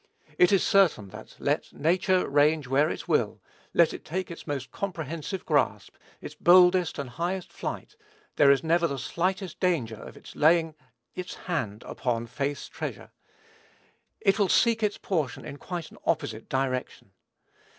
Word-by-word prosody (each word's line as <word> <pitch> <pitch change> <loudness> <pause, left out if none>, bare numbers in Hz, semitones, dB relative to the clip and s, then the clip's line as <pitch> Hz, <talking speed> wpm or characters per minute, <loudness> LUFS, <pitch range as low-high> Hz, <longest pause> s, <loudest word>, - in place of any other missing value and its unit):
It 180 - +6
is 195 - +4
certain 175 - +3
that, 110 +3 -12
let 145 +2 -1
nature 180 +4 +1
range 150 +1 +3
where 140 +4 +3
it - - -5
will, - - +1 0.3
let 170 -2 +4
it - - -8
take 185 +2 -4
its 170 - -10
most 135 -3 -4
comprehensive 170 0 -5
grasp, 145 -6 0 0.3
its - - -8
boldest 180 0 +5
and 140 -3 -4
highest 175 +8 -4
flight, - - -6 0.4
there 145 - +5
is 140 +2 +4
never 170 +1 +2
the 140 - -4
slightest 185 - -2
danger 140 - 0
of - - -11
its - - -13
laying 160 +1 +3 0.4
its 180 0 -6
hand 110 - -4
upon 120 -2 -2
faith's 140 +4 -3
treasure. - - -7 1.1
It 195 +2 +2
will 200 -3 +3
seek 230 -2 +3
its 210 -1 0
portion 155 - -2
in 140 -1 -7
quite 175 0 -6
an - - -15
opposite 110 0 -2
direction. 130 -1 -2
160 Hz, 155 wpm, -27 LUFS, 140-180 Hz, 1.1 s, It